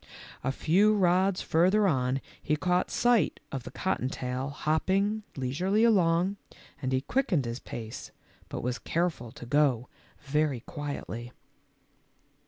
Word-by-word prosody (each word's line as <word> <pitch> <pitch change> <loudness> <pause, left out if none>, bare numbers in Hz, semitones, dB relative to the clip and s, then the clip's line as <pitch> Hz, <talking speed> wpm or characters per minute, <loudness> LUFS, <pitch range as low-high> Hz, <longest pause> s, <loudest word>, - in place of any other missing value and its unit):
A 135 - +1
few 195 +10 +3
rods 185 0 +2
further 190 +6 +3
on 130 -4 +1 0.2
he 150 - +1
caught 180 +3 +1
sight 240 -3 +2
of 135 - -3
the - - -8
cotton 185 -9 -1
tail 130 +1 -3
hopping 190 +9 0
leisurely 175 - +1
along, 190 -3 +3 0.4
and 130 -2 -1
he 130 0 +2
quickened 180 - 0
his 120 +1 -4
pace, 115 -1 -7 0.4
but - - -5
was 125 +1 -2
careful 165 -9 -1
to - - -10
go 130 -3 +2 0.3
very 145 -3 0
quietly. 135 -4 -6
155 Hz, 130 wpm, -29 LUFS, 130-190 Hz, 0.4 s, few